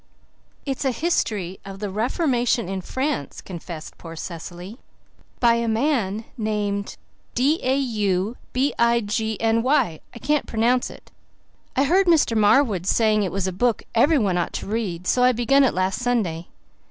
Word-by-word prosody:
"It's 270 -1 -3
a 270 - +2
History 215 - -1
of 195 -1 -8
the 200 -1 -4
Reformation 240 - 0
in 190 0 -3
France," 260 - -3
confessed 170 -3 -8
poor 165 -1 -9
Cecily, 175 - -8 0.6
"by 235 -1 +5
a 235 0 0
man 225 -3 0
named 205 -2 -2 0.4
D 280 +6 +2
a 260 +1 +1
u 210 -5 0 0.2
b 265 +3 +1
i 235 0 +4
g 220 0 -2
n 225 0 +2
y. 235 - +1
I - - -11
can't 295 +4 0
pronounce 240 +3 +1
it. - - -14 0.6
I 270 - +3
heard 370 +7 +3
Mr. 315 -9 +4
Marwood 210 -3 +3
saying 215 -1 +3
it 190 -4 -1
was 195 -1 -1
a 190 - -1
book 230 +4 0
everyone 230 - +3
ought 175 - -2
to - - -4
read, 200 -5 -3
so 250 - +2
I 250 0 +5
began 270 +4 +3
it 265 - +2
last 185 +1 0
Sunday. 200 -10 -1
225 Hz, 165 wpm, -23 LUFS, 190-255 Hz, 0.6 s, by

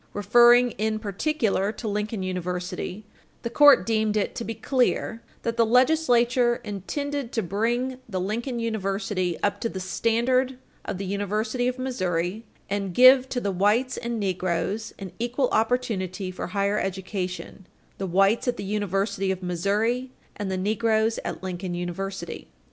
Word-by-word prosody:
Referring 240 +4 +6
in 215 0 0
particular 215 -1 0
to 225 - -7
Lincoln 210 -1 -2
University, 180 +2 -4 0.4
the 235 - -3
court 290 +3 +7
deemed 220 -1 +1
it 205 - 0
to - - -4
be 225 0 -4
clear 230 -1 0 0.2
"that 230 0 -2
the 230 - +5 0.2
Legislature 245 -4 +3
intended 275 +7 -4
to 225 - -1
bring 240 +7 -1
the 190 -3 -2
Lincoln 235 +7 -2
University 195 -5 -1
up 205 0 0
to 230 - 0
the 190 - -5
standard 240 +7 +1 0.3
of - - -3
the 195 - -4
University 210 +5 -1
of 250 0 -1
Missouri, 185 -6 -2 0.2
and 195 -3 -3
give 255 +1 +7
to 250 - -1
the 205 -4 -1
whites 210 +8 +2
and 235 -1 -3
negroes 185 +2 -1
an 195 -3 -7
equal 245 +2 0
opportunity 210 -6 0
for 185 - -5
higher 200 +1 0
education 185 0 -4 0.3
the 195 - -2
whites 195 +7 +3
at 245 - 0
the - - -5
University 195 -1 -1
of 190 0 -2
Missouri, 210 +8 0 0.3
and 205 -2 -4
the 190 - -1
negroes 220 +3 +1
at - - -5
Lincoln 180 -1 -4
University." 175 +1 -5
210 Hz, 150 wpm, -25 LUFS, 190-240 Hz, 0.4 s, court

